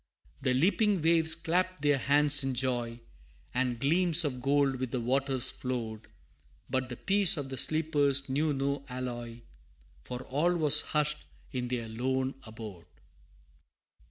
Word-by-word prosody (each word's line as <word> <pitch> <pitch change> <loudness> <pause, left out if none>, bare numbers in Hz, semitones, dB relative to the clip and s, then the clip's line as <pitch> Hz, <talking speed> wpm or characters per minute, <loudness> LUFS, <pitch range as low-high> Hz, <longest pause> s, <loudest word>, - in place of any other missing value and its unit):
The 130 -2 +1
leaping 195 - +2
waves 160 -1 +3
clapped 180 0 -1
their 145 -2 +3
hands 145 +1 +3
in 135 -1 -2
joy, 120 -2 -1 0.5
And 125 -2 -1
gleams 170 +4 +2
of 130 -3 -3
gold 140 0 +2
with 130 0 -3
the 125 - -2
waters 130 +1 +1
flowed, 115 -4 -5 0.6
But 130 -1 -2
the 125 - -6
peace 195 -3 +5
of 140 -2 -4
the 130 - -5
sleepers 145 -3 +2
knew 150 +4 0
no 140 0 -2
alloy, 120 -2 -6 0.6
For 125 +1 -6
all 170 +6 0
was 150 -4 +4
hushed 150 0 0 0.3
in 125 -3 -3
their 120 -2 -3
lone 130 +4 -1
abode! 110 -6 -10
135 Hz, 140 wpm, -30 LUFS, 125-150 Hz, 0.6 s, peace